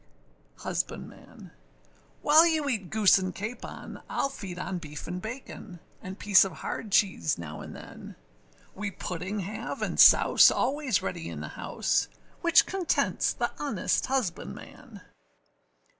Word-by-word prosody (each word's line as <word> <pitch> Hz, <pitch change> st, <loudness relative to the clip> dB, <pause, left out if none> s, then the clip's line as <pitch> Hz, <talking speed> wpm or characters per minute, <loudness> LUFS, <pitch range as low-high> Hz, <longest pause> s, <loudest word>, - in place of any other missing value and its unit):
HUSBANDMAN. -, -, -6 dB, 0.7 s
While 315 Hz, +3 st, +7 dB
you 315 Hz, -3 st, 0 dB
eat 210 Hz, -10 st, -2 dB
goose 210 Hz, -3 st, +5 dB
and 185 Hz, -1 st, -4 dB
capon, 220 Hz, +5 st, -7 dB
Iâll 275 Hz, -, -1 dB
feed 190 Hz, -9 st, -8 dB
on 180 Hz, 0 st, -4 dB
beef 150 Hz, -2 st, -9 dB
and 180 Hz, +1 st, -5 dB
bacon, 220 Hz, -5 st, -8 dB, 0.2 s
And 185 Hz, +1 st, -8 dB
piece 205 Hz, -2 st, +5 dB
of 195 Hz, -, -3 dB
hard 210 Hz, +5 st, -6 dB
cheese 190 Hz, -, +2 dB
now 75 Hz, -3 st, -7 dB
and -, -, -9 dB
than; -, -, -11 dB, 0.6 s
We 205 Hz, +1 st, -4 dB
pudding 185 Hz, +2 st, -5 dB
have, 200 Hz, +4 st, -5 dB
and -, -, -3 dB
souse, -, -, +8 dB
always 265 Hz, -4 st, 0 dB
ready 85 Hz, -3 st, -4 dB
in 80 Hz, -3 st, -7 dB
the 75 Hz, -, -6 dB
house, -, -, -1 dB, 0.3 s
Which -, -, +5 dB
contents 370 Hz, -3 st, 0 dB
the -, -, -2 dB
honest 275 Hz, -10 st, -1 dB
husbandman. 230 Hz, -, -4 dB
200 Hz, 135 wpm, -28 LUFS, 180-250 Hz, 0.7 s, souse